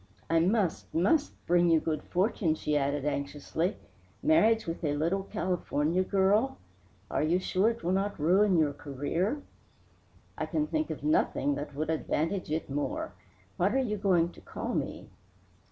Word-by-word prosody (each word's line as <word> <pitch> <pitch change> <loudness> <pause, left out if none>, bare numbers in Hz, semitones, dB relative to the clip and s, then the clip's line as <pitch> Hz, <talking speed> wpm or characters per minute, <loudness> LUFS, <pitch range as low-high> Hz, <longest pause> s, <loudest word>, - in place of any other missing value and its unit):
I 165 - +5
must, 185 0 +1
must 280 - +2
bring 175 0 +4
you 165 -1 +5
good 155 -1 -2
fortune," 180 -3 0
she 150 -1 -1
added 140 0 0
anxiously. 150 +5 -2 0.5
"Marriage 230 -8 +4
with 165 +1 -5
a 145 -2 +1
little 170 +6 +1
California 175 -2 0
girl 205 +7 +2 0.5
are - - +1
you 160 +4 +2
sure 185 +3 +2
it 230 0 -5
will 175 - 0
not 195 0 -1
ruin 185 +5 +4
your 150 -3 +2
career?" 150 - -2 1.0
"I - - -1
can 305 -1 0
think 310 0 -1
of - - -5
nothing 300 - +2
that 145 0 -5
would 155 +2 -1
advantage 165 +3 -1
it 155 +2 -2
more. 145 +1 -3 0.4
What 195 +7 +2
are - - +4
you 245 -6 0
going 180 -4 +2
to - - -16
call - - -5
me?" - - -4
175 Hz, 160 wpm, -29 LUFS, 155-205 Hz, 1.0 s, I